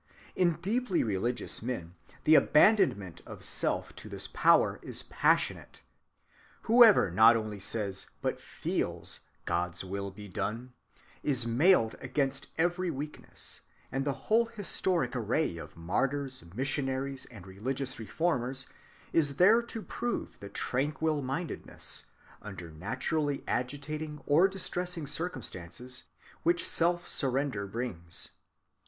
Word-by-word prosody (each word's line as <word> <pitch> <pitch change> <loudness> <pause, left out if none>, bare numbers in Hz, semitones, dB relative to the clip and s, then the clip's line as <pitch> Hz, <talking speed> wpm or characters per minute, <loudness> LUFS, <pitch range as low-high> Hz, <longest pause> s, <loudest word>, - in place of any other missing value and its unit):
In 175 -2 +3
deeply 215 -1 +1
religious 115 +3 -1
men 110 -8 -4 0.3
the 155 - +5
abandonment 150 - +4
of - - -8
self - - 0
to - - -8
this - - -1
power - - +4
is - - -3
passionate. - - 0 0.8
Whoever 225 - +7
not 110 +5 +7
only 110 -2 -4
says, 100 -1 0 0.2
but - - -1
feels, - - 0 0.3
"God's 90 +1 -1
will 100 +1 -4
be 105 +2 -10
done," 115 +6 -4 0.5
is 130 -5 +1
mailed 120 0 +4
against 135 +1 -1
every 175 +2 +1
weakness; 150 0 -3 0.3
and 135 +2 -1
the 140 0 0
whole 230 +2 +4
historic 185 - 0
array 120 - 0
of 75 -1 -10
martyrs, 130 +10 -1
missionaries, 135 0 -1
and 105 -7 -12
religious 130 +8 -3
reformers 130 0 -1 0.5
is 145 -4 +3
there 210 +9 +6
to 230 -2 -7
prove 240 0 -4
the 100 - -8
tranquil‐mindedness, 150 - -2 0.4
under 95 -5 -8
naturally 135 - -2
agitating 150 +4 -3
or 160 +6 +5
distressing 180 -3 -3
circumstances, 125 - -5 0.4
which 170 +1 +2
self‐surrender 140 - 0
brings. 90 -8 -3
135 Hz, 110 wpm, -30 LUFS, 110-165 Hz, 0.8 s, Whoever